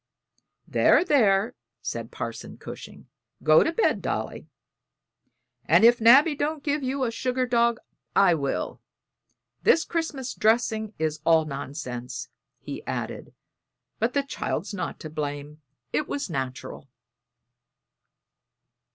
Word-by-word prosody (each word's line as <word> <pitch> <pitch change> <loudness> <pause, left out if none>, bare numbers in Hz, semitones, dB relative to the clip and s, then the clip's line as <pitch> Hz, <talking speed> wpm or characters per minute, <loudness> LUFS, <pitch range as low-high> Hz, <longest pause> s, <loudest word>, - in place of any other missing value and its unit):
"There, 355 - +4
there," 220 - +3 0.3
said - - -4
Parson - - -6
Cushing, - - -10 0.4
"go 155 0 +6
to 325 - 0
bed, 440 +7 +1
Dolly; - - -4 1.2
and - - +5
if 240 0 +6
Nabby 275 +8 +7
don't 290 +1 -2
give 290 0 0
you 265 +1 -1
a 235 - 0
sugar 255 +2 -1
dog, 235 -1 +2 0.4
I 195 -3 +6
will. 140 -4 -2 0.8
This 395 -8 +4
Christmas 300 -6 -3
dressing 220 -1 +1
is 155 -1 -2
all 160 -1 +4
nonsense," 135 -3 -6 0.3
he - - -8
added, - - -5 0.6
"but 230 +3 0
the 280 - +2
child's 275 - -4
not 200 - -4
to 155 - -6
blame 150 0 -5 0.3
it 300 - 0
was 285 -10 -3
natural." 135 0 -5
225 Hz, 115 wpm, -26 LUFS, -, 1.2 s, Nabby